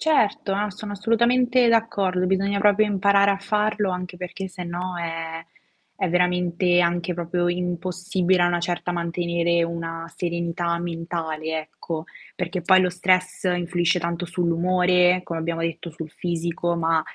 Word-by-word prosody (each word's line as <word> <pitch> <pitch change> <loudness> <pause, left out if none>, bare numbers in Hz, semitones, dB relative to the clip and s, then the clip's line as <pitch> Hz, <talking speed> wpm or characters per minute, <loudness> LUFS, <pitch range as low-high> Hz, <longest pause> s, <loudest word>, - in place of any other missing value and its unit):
Certo, 220 -10 +2
a 205 +2 0
sono 205 +2 -7
assolutamente 235 +4 +3
d'accordo, 200 -5 +1
bisogna 195 +2 +1
proprio 205 +1 +4
imparare 200 0 +3
a 195 - 0
farlo, 210 -1 0
anche 180 0 -5
perché 180 +2 -6
sennò 180 0 -5
è 165 -1 -5 0.5
è 190 - 0
veramente 180 0 +2
anche 175 0 0
proprio 175 +1 -1
impossibile 180 +1 0
a 175 - +4
una 175 0 +1
certa 175 +1 -2
mantenere 170 0 0
una 165 0 -4
serenità 170 0 -2
mentale, 165 -2 -3
ecco. 160 +1 -6 0.3
Perché 180 0 -3
poi 185 +2 +6
lo 180 -1 +2
stress 185 +1 +1
influisce 175 -1 +1
tanto 170 +1 -3
sull'umore, 180 +1 +2
come 170 -2 -4
abbiamo 165 +1 -2
detto, 165 +1 -3
sul 160 0 -8
fisico, 170 0 -2
ma 165 -1 +2
180 Hz, 140 wpm, -24 LUFS, 170-185 Hz, 0.5 s, poi